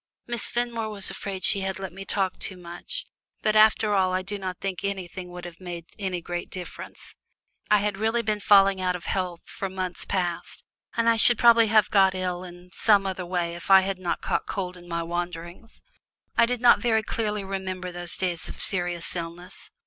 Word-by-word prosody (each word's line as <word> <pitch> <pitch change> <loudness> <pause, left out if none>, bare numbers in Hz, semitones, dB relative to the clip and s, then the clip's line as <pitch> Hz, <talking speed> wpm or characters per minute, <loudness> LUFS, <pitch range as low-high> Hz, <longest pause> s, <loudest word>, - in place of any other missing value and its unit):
Miss 240 -2 0
Fenmore 235 -2 -2
was 205 -2 -1
afraid 190 -2 -6
she 200 - +4
had 190 0 -2
let 190 -2 -6
me 195 +1 -8
talk 190 -1 -1
too 190 - -3
much, 175 - -6 0.4
but 215 - +2
after 215 0 +5
all 185 -2 +2
I 185 0 0
do 200 +1 -5
not 185 -2 -4
think 195 -2 -4
anything 185 -2 -4
would 175 0 -8
have 175 -1 -10
made 175 -2 -7
any 185 -3 -2
great 175 +1 -5
difference. 180 -1 -8 0.6
I 210 - +6
had 205 -1 -1
really 225 +2 +1
been 210 -1 0
falling 195 -2 +5
out 180 -1 +1
of 175 - -8
health 180 -3 -2
for 195 - -5
months 185 -1 -4
past, 175 -3 -3 0.3
and 230 0 +2
I 230 0 +5
should 235 +1 +7
probably 230 -1 +6
have 215 -2 +4
got 190 -2 +5
ill 180 -1 -2
in 175 0 -12
some 205 -2 +4
other 185 -2 -3
way 175 -1 -1
if 170 +2 -9
I 190 0 +9
had 190 0 -3
not 175 -2 -2
caught - - -1
cold 185 -2 -3
in 175 -1 -14
my 170 -1 -2
wanderings. 175 +4 -6 0.5
I 235 - +5
do 250 +1 0
not 240 -3 +6
very 220 0 +2
clearly 210 -2 -2
remember 190 -1 -4
those 175 0 -3
days 175 -3 -2
of - - -9
serious 175 -3 0
illness. 175 +2 -7
190 Hz, 200 wpm, -26 LUFS, 175-210 Hz, 0.6 s, I